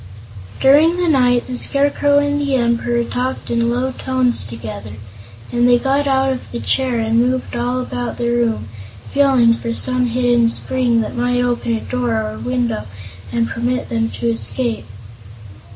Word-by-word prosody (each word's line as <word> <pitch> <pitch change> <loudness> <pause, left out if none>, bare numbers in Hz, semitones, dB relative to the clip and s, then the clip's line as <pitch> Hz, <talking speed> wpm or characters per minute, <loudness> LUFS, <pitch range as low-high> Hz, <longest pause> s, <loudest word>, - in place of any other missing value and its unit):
During 305 +6 +5
the 355 -1 0
night 250 -5 +3
the 255 - -5
Scarecrow 285 +2 +2
and 290 0 +1
the 280 -2 0
Emperor 235 -1 +1
talked 250 +2 -4
in 235 0 +1
low 250 +2 -1
tones 255 -1 +1
together, 105 -2 -7 0.6
and 240 0 +2
they 245 - +6
got 275 +3 0
out 265 0 +2
of 255 - -9
the 240 - -4
chair 260 -3 0
and 225 0 +1
moved 250 +1 0
all 245 +1 -1
about 245 -1 -4
the 235 0 -1
room, 235 - 0 0.5
feeling 265 -5 +4
for 230 0 -4
some 255 -1 0
hidden 240 -1 +2
spring 245 -1 +1
that - - -5
might 245 0 +1
open 240 -1 -1
a 225 - -4
door 120 -3 -1
or 110 0 -5
window 115 -3 -2 0.4
and 230 -1 0
permit 245 +2 -2
them 225 -1 0
to - - -6
escape. 230 - -1
245 Hz, 165 wpm, -18 LUFS, 230-260 Hz, 0.6 s, they